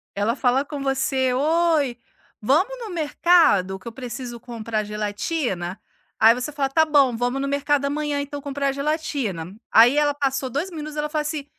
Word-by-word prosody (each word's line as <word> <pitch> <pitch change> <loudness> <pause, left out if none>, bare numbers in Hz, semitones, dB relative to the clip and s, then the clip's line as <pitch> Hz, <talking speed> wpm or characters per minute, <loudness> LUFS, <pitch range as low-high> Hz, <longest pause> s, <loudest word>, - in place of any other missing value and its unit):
Ela 210 +4 0
fala 265 +1 +1
com 285 -1 -6
você: 265 -1 0
"Oi, 305 -2 +1 0.4
vamos 360 - +2
no 450 -3 -7
mercado 310 - +3
que 190 - -14
eu - - -5
preciso 240 -1 -7
comprar 225 -3 -4
gelatina", 210 - -3 0.4
aí 225 +1 +7
você 250 +5 -4
fala: 280 -2 -1
"Tá 320 +3 +4
bom, 280 -6 +3
vamos 245 +3 -1
no 275 - -2
mercado 280 0 0
amanhã 295 0 -1
então 285 0 -5
comprar 280 0 -1
gelatina". 275 - -3 0.2
Aí 245 +6 +6
ela 290 -1 +2
passou 270 -2 -1
2 305 +9 -3
minutos 305 -1 -7
ela 300 0 -1
falou 305 0 -1
assim: 300 -1 -4
275 Hz, 170 wpm, -23 LUFS, 240-300 Hz, 0.4 s, aí